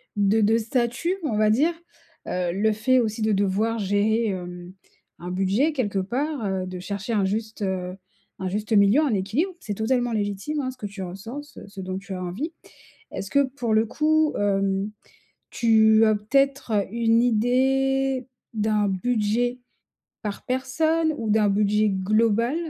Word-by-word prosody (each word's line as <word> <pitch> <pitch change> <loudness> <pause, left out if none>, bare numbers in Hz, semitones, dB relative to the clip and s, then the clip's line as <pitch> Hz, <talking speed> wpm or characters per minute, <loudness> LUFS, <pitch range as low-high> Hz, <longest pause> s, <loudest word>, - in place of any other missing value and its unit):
de 205 +2 +3
de 220 +2 +4
statut, 245 - -1
on 230 -9 -1
va 215 0 +3
dire. 290 +11 +3 0.5
Heu, 180 -1 -1
le 215 +3 +2
fait 255 +5 +2
aussi 220 -2 -1
de 215 0 +2
devoir 205 +3 0
gérer, 210 +3 +1
hem, 180 -1 -6 0.5
un 175 - -6
budget 195 - +1
quelque 205 -8 -1
part, 260 +6 -2
heu, 190 -1 -1
de 185 0 -6
chercher 200 +4 -5
un 200 -2 +2
juste, 215 +2 -3
heu, 185 -1 -3 0.4
un 190 - -3
juste 210 +4 -4
milieu, 205 +7 +5
un 285 -7 +1
équilibre, 225 - -1
c'est 210 - -5
totalement 240 +3 0
légitime, 205 +8 -2
hein, 260 -1 -3
ce 255 - -16
que 210 - -7
tu 195 -1 -6
ressens, 200 +10 -7
ce, 290 -7 -13
ce 200 -1 -9
dont 185 0 -4
tu 195 0 -7
as 185 - -4
envie. 230 - -4 0.6
Est-ce 195 - -5
que, 280 0 +4
pour 255 -4 -2
le 220 +1 +3
coup, 310 +4 +2
hem, 195 0 0 0.6
tu 220 -1 +4
as 215 - +4
peut-être 235 -1 +1
une 230 0 +3
idée 265 +3 +1 0.3
d'un 210 -1 +1
budget 230 +4 0 0.6
par 210 -2 -5
personne 315 +5 0
ou 225 - -3
d'un 215 -1 +3
budget 210 +1 +2
global, 215 +6 +1
220 Hz, 165 wpm, -24 LUFS, 200-250 Hz, 0.6 s, milieu